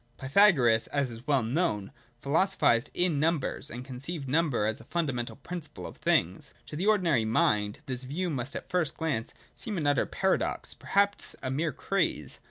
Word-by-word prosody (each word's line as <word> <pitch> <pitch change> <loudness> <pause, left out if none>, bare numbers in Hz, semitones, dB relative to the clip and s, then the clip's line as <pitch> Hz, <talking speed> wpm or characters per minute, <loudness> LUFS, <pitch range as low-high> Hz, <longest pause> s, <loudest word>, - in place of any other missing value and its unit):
(3) 130 - -7
Pythagoras, 135 - +5
as 140 -3 -1
is 115 +2 -10
well 140 -5 +3
known, 115 - -1 0.3
philosophised 145 -6 +2
in 175 -5 +1
num 165 +3 +3
bers, 135 - -5
and 125 +2 -7
conceived 140 +3 -5
number 140 -6 +1
as 110 0 -1
the - - -12
fijndamental 135 -6 -3
principle 150 - -7
of - - -9
things. - - 0
To - - -8
the 180 +7 -1
ordinary 175 - +3
mind 105 -2 +1
this 130 -2 -4
view 165 +7 -2
must 130 -1 -3
at - - -5
first 175 -6 0
glance 145 -9 -2 0.2
seem 215 -5 -5
an 155 - -1
utter 145 -3 +2
paradox, - - 0
perhaps 200 +1 +1
a 130 - -2
mere 155 +4 0
craze. 150 - -1
140 Hz, 180 wpm, -29 LUFS, 120-170 Hz, 0.3 s, Pythagoras